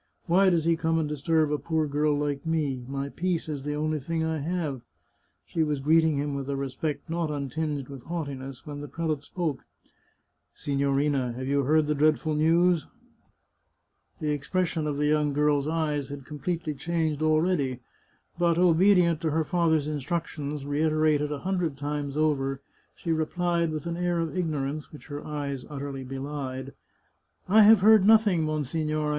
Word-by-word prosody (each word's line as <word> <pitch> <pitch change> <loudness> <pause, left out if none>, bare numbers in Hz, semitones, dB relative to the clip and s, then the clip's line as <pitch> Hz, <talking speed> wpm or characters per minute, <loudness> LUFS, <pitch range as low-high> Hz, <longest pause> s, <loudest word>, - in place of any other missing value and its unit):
" - - -46
Why 190 +3 +4
does 170 -3 +1
he 165 0 +3
come 165 0 0
and 160 -2 0
disturb 150 +1 +1
a 150 - 0
poor 160 -2 0
girl 150 0 +1
like 145 -1 -2
me? 150 -6 -1
My 140 +1 -3
peace 175 +1 -2
is 150 -3 -4
the 150 +1 -3
only 155 +1 -1
thing 160 +3 -2
I 160 -1 -1
have! 155 -4 -2 0.3
" - - -44
She 165 - -2
was 150 -2 0
greeting 160 +1 +3
him 145 0 -1
with 140 0 -4
a 140 - -1
respect 140 +3 -3
not 165 -1 -1
untinged 145 0 -3
with 140 -3 -9
haughtiness 135 -6 -5
when 145 -1 -6
the 145 - -6
prelate 155 -2 -2
spoke: 155 -2 -3 0.5
" - - -48
Signorina, 140 -2 +1
have 130 +2 -5
you 140 0 +1
heard 155 +2 +3
the 150 - +1
dreadful 155 +1 +2
news? 165 +2 +3 0.6
" - - -46
The 150 -1 -1
expression 160 +2 -1
of 145 -1 -2
the 150 - +1
young 150 -1 +2
girl's 145 0 +2
eyes 150 -3 -1
had 140 -2 -8
completely 155 +2 -3
changed 155 +1 -1
already, 155 -4 +1 0.6
but, 170 -1 +3
obedient 175 -1 +4
to 160 - 0
her 160 +2 +1
father's 160 -3 +1
instructions, 150 -1 -3
reiterated 155 0 +1
a 145 -2 -4
hundred 180 -6 -1
times 145 0 -3
over, 135 -3 +1 0.4
she 170 - -3
replied, 170 +1 0
with 155 0 -4
an 170 0 -3
air 175 -1 0
of 165 +1 -2
ignorance 150 -4 -2
which 150 - -13
her 145 0 -6
eyes 140 -3 -4
utterly 140 -2 -5
belied: 135 0 -5 0.4
" - - -47 0.3
I 215 +4 +6
have 215 -1 +7
heard 215 0 +7
nothing, 215 -6 +5
monsignore." 155 0 -1
150 Hz, 175 wpm, -27 LUFS, 140-165 Hz, 0.6 s, have